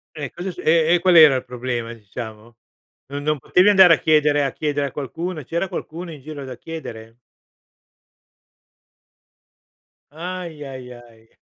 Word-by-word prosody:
E 145 -4 -5
cosa 180 +2 -6
è - - -4
su - - -10
e 165 +1 +3
e - - +4
qual 180 -1 +4
era 155 -4 +8
il 130 - -4
problema, 120 -2 -4
diciamo? 110 +1 -10 0.5
No 140 - -4
non 150 0 -1
potevi 180 +9 +3
andare 190 -4 +8
a - - -3
chiedere 150 -2 +3
a 135 - -2
chiedere 145 -2 -1
a - - -12
qualcuno. 155 +4 -5
C'era 170 +6 -2
qualcuno 170 +1 -6
in 145 - -11
giro 145 0 -8
da 130 -2 -8
chiedere? 115 -9 -9 3.0
Ahia 165 -4 -7
ahiai. 120 -3 -13
145 Hz, 150 wpm, -21 LUFS, 125-165 Hz, 3.0 s, era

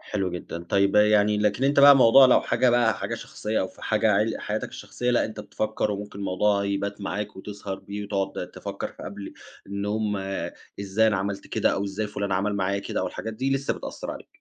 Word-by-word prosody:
حلو 95 -3 -2
جدًا. 90 -1 -6
طيّب 100 +2 +2
يعني 105 0 +4
لكن 105 +5 +1
أنت 140 +1 +4
بقى 140 0 +9
موضوع 130 +1 +8
لو 125 - +5
حاجة 125 - +2
بقى، 120 -3 +3
حاجة - - -3
شخصية 110 +1 -3
أو 95 - -1
في - - -18
حاجة 110 0 +2
عل 105 +3 +2
حياتك - - -3
الشخصية، 125 0 -4
لأ، 120 - +3
أنت 110 - -6
بتفكّر 110 0 -2
وممكن 100 0 -6
الموضوع 100 +1 +1
يبات 100 +1 -2
معاك 105 +1 -4
وتسهر 100 0 -6
بيه 100 +2 -7
وتقعد 100 -1 -3
تفكّر - - -6
في - - -12
قبل 100 0 -7 0.3
إن 100 +1 -4
هم 105 0 -1 0.6
إزاي 100 +3 +2
أنا 105 - +2
عملت 100 +1 -3
كده - - +1
أو 100 - -1
إزاي 100 +2 -3
فُلان 100 -1 -3
عمل 100 +2 0
معايا 100 +1 0
كده 100 - -3
أو - - -1
الحاجات 110 - -5
دي 135 +4 0
لسّه 135 +1 -1
بتأثّر - - -6
عليك. - - -8
105 Hz, 210 wpm, -25 LUFS, 100-110 Hz, 0.6 s, بقى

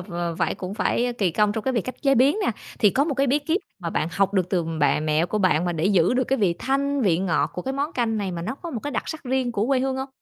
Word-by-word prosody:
v 180 - -10 0.3
vậy - - 0
cũng 185 +2 -6
phải 245 +2 0
kì 195 -4 +2
công 210 +4 +2
trong 220 0 -4
cái 265 - +1
việc 235 - +1
cách 255 -1 -7
chế 275 -2 +4
biến 275 - +4
nè, - - +2 0.3
thì 210 - +5
có 275 +8 +2
một 300 -2 -1
cái 275 +1 +1
bí 275 +3 +3
kíp 320 +7 -1 0.2
mà 170 -3 -4
bạn 160 - -1
học 195 0 +1
được 185 -2 +1
từ 180 -3 +1 0.2
bạ 145 - +3
mẹ 155 +2 +1
của 215 - -2
bạn 180 -4 +2
mà 175 - 0
để 160 -1 -2
giữ 190 +1 +3
được 255 0 +2
cái 270 - 0
vị 190 -6 +2
thanh, 280 +1 0
vị 175 -6 +3
ngọt 185 -3 0
của 180 - -5
cái 265 - -3
món 285 +4 -2
canh 230 -5 0
này 200 -2 -2
mà 170 -1 -4
nó 180 - -3
có 335 +4 -8
một 240 -7 -4
cái 290 - -3
đặc - - -2
sắc 315 - -6
riêng 255 -1 0
của 210 -1 0
quê 265 -1 +2
hương 265 0 -1
hông? 265 +1 -4
230 Hz, 315 wpm, -24 LUFS, 185-270 Hz, 0.3 s, thì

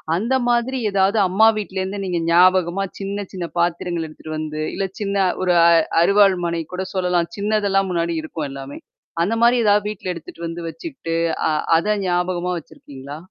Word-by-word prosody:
அந்த 230 +8 -1 0.2
மாதிரி 240 +2 +1
ஏதாவது 195 +2 +2
அம்மா 200 +5 +4
வீட்லருந்து 190 -1 -3
நீங்க 180 -2 -1
ஞாபகமா 185 +1 +4 0.2
சின்ன 200 +1 -4
சின்ன 180 -2 -4
பாத்திரங்கள் 170 -1 -1
எடுத்துட்டு 155 0 -8
வந்து, 155 0 -4
இல்ல 195 - -1
சின்ன 200 -1 +1 0.2
ஒரு 180 - +2
அ - - +7 0.3
அறுவாள் 200 +1 +5
மனை 170 -1 -2
கூட 185 +1 -3
சொல்லலாம். 180 -2 +1
சின்னதெல்லாம் 200 -2 +1
முன்னாடி 170 -1 -1
இருக்கும் 155 -1 -5
எல்லாமே. 135 0 -8 0.4
அந்த 210 +6 0
மாரி 240 +1 +5
ஏதாவது 205 0 +3
வீட்ல 190 -3 -5
எடுத்துட்டு 170 0 -9
வந்து 170 +1 -6
வச்சுட்டு 245 - -6 0.3
அ - - +1 0.3
அத 210 +5 0
ஞாபகமா 180 0 0
வச்சிருக்கீங்களா? 140 -2 -11
185 Hz, 160 wpm, -21 LUFS, 170-200 Hz, 0.4 s, அ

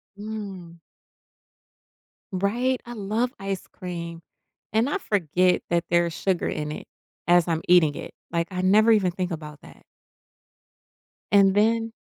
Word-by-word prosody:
Mhm. 200 -5 -7 1.5
Right, 240 +7 0
I 240 - -7
love 220 +4 -1
ice 195 -1 -4
cream, 170 -2 -7 0.5
and 230 +5 +2
I 350 - 0
forget 180 - +1
that 170 0 +1
there's 170 0 +2
sugar 185 0 -1
in 150 -1 -3
it - - -8 0.4
as 175 0 +4
I'm 165 -1 0
eating 160 -5 +5
it, - - -8 0.2
like 170 0 0
I 185 0 -2
never 215 +4 +5
even 195 -5 +3
think 180 0 -3
about 150 -2 -7
that. - - -16 1.5
And 195 -1 +6
then 225 +2 +2
185 Hz, 135 wpm, -25 LUFS, 170-215 Hz, 1.5 s, And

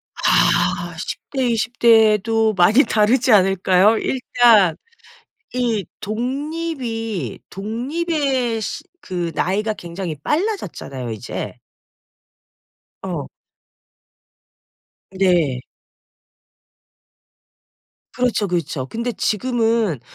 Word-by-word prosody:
아. - - +2
10 - - -5
대, 265 -2 0
20 230 +1 -2
대도 225 -1 +4
많이 205 +8 +5
다르지 235 +3 +2
않을까요? 195 +1 +4
일단 235 -8 +3 0.8
이 235 -6 0
독립이 240 - -4
독립의 255 - -2
시 290 - -5 0.2
그 175 -2 -3
나이가 210 +6 0
굉장히 170 -3 -6
빨라졌잖아요 295 - -3
이제. 110 -2 -5 1.5
어. - - -4 1.8
네. 175 -9 +2 2.6
그렇죠, 245 -5 0
그렇죠. 160 -6 -2
근데 235 - -3
지금은 225 - 0
220 Hz, 150 characters per minute, -20 LUFS, 185-250 Hz, 2.6 s, 많이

